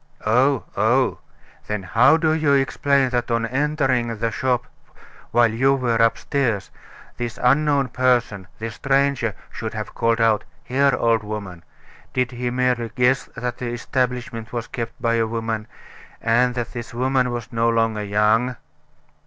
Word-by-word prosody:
"Oh, 125 Hz, +4 st, +3 dB
oh! 120 Hz, +6 st, +2 dB, 0.5 s
Then 105 Hz, -2 st, -3 dB
how 115 Hz, -, +4 dB
do 160 Hz, -1 st, +1 dB
you 155 Hz, -3 st, +2 dB
explain 140 Hz, 0 st, +2 dB
that 120 Hz, -1 st, -1 dB
on 115 Hz, -1 st, +1 dB
entering 130 Hz, -3 st, 0 dB
the 115 Hz, +1 st, -1 dB
shop 125 Hz, -1 st, 0 dB, 0.6 s
while 120 Hz, -1 st, +3 dB
you 135 Hz, +5 st, +3 dB
were 120 Hz, -4 st, 0 dB
upstairs, 115 Hz, -2 st, 0 dB, 0.5 s
this 120 Hz, -2 st, -4 dB
unknown 140 Hz, +1 st, +2 dB
person 120 Hz, -7 st, +1 dB
this 115 Hz, 0 st, -5 dB
stranger 135 Hz, -3 st, +1 dB, 0.2 s
should 110 Hz, -1 st, -5 dB
have 105 Hz, -1 st, -5 dB
called 115 Hz, 0 st, +1 dB
out: 110 Hz, -2 st, +3 dB, 0.2 s
'Here, 140 Hz, +1 st, +2 dB
old 115 Hz, -2 st, +2 dB
woman!' 100 Hz, -5 st, -6 dB, 0.5 s
Did 125 Hz, 0 st, 0 dB
he 125 Hz, 0 st, -3 dB
merely 125 Hz, -2 st, 0 dB
guess 125 Hz, +1 st, +2 dB
that 125 Hz, -1 st, -4 dB
the 125 Hz, -, -3 dB
establishment 120 Hz, -1 st, -3 dB
was 120 Hz, -2 st, -3 dB
kept 115 Hz, -1 st, -6 dB
by 115 Hz, 0 st, +1 dB
a 115 Hz, -, +1 dB
woman; 115 Hz, -1 st, -3 dB, 0.5 s
and 120 Hz, +2 st, +2 dB
that 120 Hz, -2 st, -4 dB
this 120 Hz, -1 st, -7 dB
woman 130 Hz, 0 st, +1 dB
was 120 Hz, 0 st, -5 dB
no 115 Hz, 0 st, +2 dB
longer 115 Hz, -2 st, +1 dB
young?" 105 Hz, +5 st, +2 dB
120 Hz, 150 wpm, -22 LUFS, 115-130 Hz, 0.6 s, how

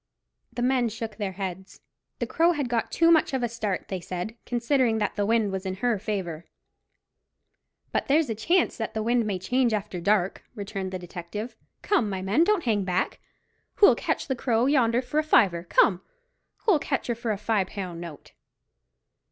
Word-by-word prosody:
The 240 Hz, +1 st, -3 dB
men 250 Hz, -2 st, +2 dB
shook 220 Hz, 0 st, -6 dB
their 200 Hz, -3 st, -3 dB
heads. 190 Hz, 0 st, -6 dB, 0.4 s
The -, -, -2 dB
Crow 335 Hz, +2 st, +3 dB
had 290 Hz, -5 st, -2 dB
got 235 Hz, -1 st, -1 dB
too 335 Hz, 0 st, +4 dB
much 315 Hz, -4 st, +3 dB
of 255 Hz, -, -1 dB
a -, -, +2 dB
start, 220 Hz, -5 st, -3 dB
they 190 Hz, -, -3 dB
said, 180 Hz, +5 st, -5 dB
considering 245 Hz, -1 st, +1 dB
that 210 Hz, -2 st, -1 dB
the 205 Hz, -1 st, 0 dB
wind 225 Hz, -3 st, +2 dB
was 190 Hz, -1 st, -3 dB
in 190 Hz, -1 st, -3 dB
her 225 Hz, +1 st, 0 dB
favour. 185 Hz, -6 st, -4 dB, 1.4 s
"But -, -, -1 dB
there's 305 Hz, +2 st, +3 dB
a 225 Hz, -, -1 dB
chance 335 Hz, -, +1 dB
that 225 Hz, -1 st, -4 dB
the 220 Hz, -, -1 dB
wind 235 Hz, 0 st, +1 dB
may 200 Hz, -3 st, -1 dB
change 240 Hz, +5 st, +1 dB
after 200 Hz, -4 st, -3 dB
dark," 195 Hz, 0 st, +1 dB
returned 195 Hz, -2 st, -5 dB
the 185 Hz, -, -3 dB
detective. 180 Hz, +6 st, -7 dB, 0.3 s
"Come, 350 Hz, -, +2 dB
my 190 Hz, -1 st, -3 dB
men, 210 Hz, -, +3 dB
don't 400 Hz, -2 st, +2 dB
hang 215 Hz, -5 st, +1 dB
back. 185 Hz, 0 st, -1 dB, 0.6 s
Who'll 410 Hz, -, +7 dB
catch -, -, -2 dB
the 265 Hz, -, 0 dB
Crow 235 Hz, -1 st, +1 dB
yonder 255 Hz, -3 st, +3 dB
for 295 Hz, +5 st, -1 dB
a -, -, +1 dB
fiver, 190 Hz, -, +3 dB
come? 180 Hz, +1 st, +3 dB, 0.6 s
Who'll 385 Hz, -9 st, +4 dB
catch 275 Hz, -2 st, -2 dB
her 240 Hz, -, 0 dB
for 235 Hz, 0 st, -5 dB
a 210 Hz, -, 0 dB
fi' 210 Hz, -1 st, +1 dB
pound 185 Hz, -3 st, -6 dB
note?" 165 Hz, -4 st, -10 dB
220 Hz, 190 wpm, -26 LUFS, 190-245 Hz, 1.4 s, Who'll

